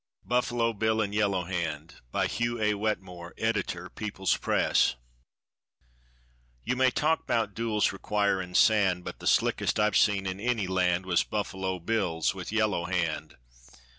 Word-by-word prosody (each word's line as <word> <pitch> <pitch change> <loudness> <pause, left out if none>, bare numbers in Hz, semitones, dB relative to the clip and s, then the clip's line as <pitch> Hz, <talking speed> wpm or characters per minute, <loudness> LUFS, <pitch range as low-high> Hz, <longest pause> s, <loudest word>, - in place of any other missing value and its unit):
BUFFALO 120 -1 +1
BILL 110 +1 0
AND 100 -2 -1
YELLOW 100 -3 +1
HAND. 85 -3 -4
(By - - +1
HUGH 120 0 -1
A. 105 0 +2
WETMORE, 95 -5 -4
Editor 105 -5 -1
People's 100 -1 -2
Press.) - - +2 1.7
You 125 - -1
may 130 0 +4
talk 155 +5 0
'bout 110 -3 0
duels 110 -1 +1
requirin' 100 -2 -1
sand, 95 -5 +4
But - - -7
the - - -5
slickest - - +2
I've 105 -1 +2
seen 100 -2 +3
in 95 0 -3
any 115 -2 0
land 90 -1 +1
Was 90 -2 +2
Buffalo 95 -3 -3
Bill's 90 -3 0
with 95 0 -7
Yellow 110 -5 +1
Hand. 90 -3 -2
100 Hz, 140 wpm, -28 LUFS, 90-110 Hz, 1.7 s, may